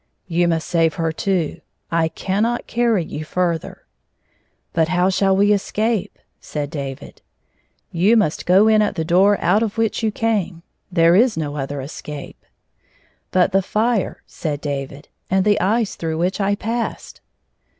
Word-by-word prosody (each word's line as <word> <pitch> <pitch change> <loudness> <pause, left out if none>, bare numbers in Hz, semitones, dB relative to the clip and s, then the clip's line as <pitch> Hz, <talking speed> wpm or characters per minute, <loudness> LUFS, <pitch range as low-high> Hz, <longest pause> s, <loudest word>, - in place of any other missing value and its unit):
" - - -49
You 175 0 +4
must 165 -1 -1
save 165 -3 +2
her, 165 -1 -1
too. 170 -1 -1 0.3
I 165 -1 +2
cannot 205 +8 -1
carry 230 -7 +1
you 155 - -6
further." 170 0 -2 0.4
" - - -44
But 160 -1 +2
how 180 +2 +2
shall 190 0 +2
we 205 +1 +4
escape 210 0 -1
1 - - -36
" - - -49
said 145 -1 -5
Davii 140 -4 -6 0.4
" - - -45
You 220 +5 +5
must 200 -8 0
go 190 +4 +6
in 215 -1 +5
at 210 - 0
the 160 -3 -2
door 190 +4 +4
out 180 +6 +2
of 225 -1 -2
which 225 0 0
you 220 - +1
came. 200 -7 -1 0.3
There 170 -1 +4
is 230 +1 +4
no 150 -2 -3
other 140 0 -4
escape." 145 +1 -8 0.9
"But 185 +1 +2
the 195 0 +3
fire," 215 +1 -1
said 150 -3 -4
David, 140 0 -5 0.2
"and 190 0 +2
the 205 -1 +3
ice 220 +2 +1
through 160 -1 -3
which 180 +5 -1
I 200 +1 +1
passed." 230 +3 -4
185 Hz, 170 wpm, -20 LUFS, 160-210 Hz, 0.9 s, go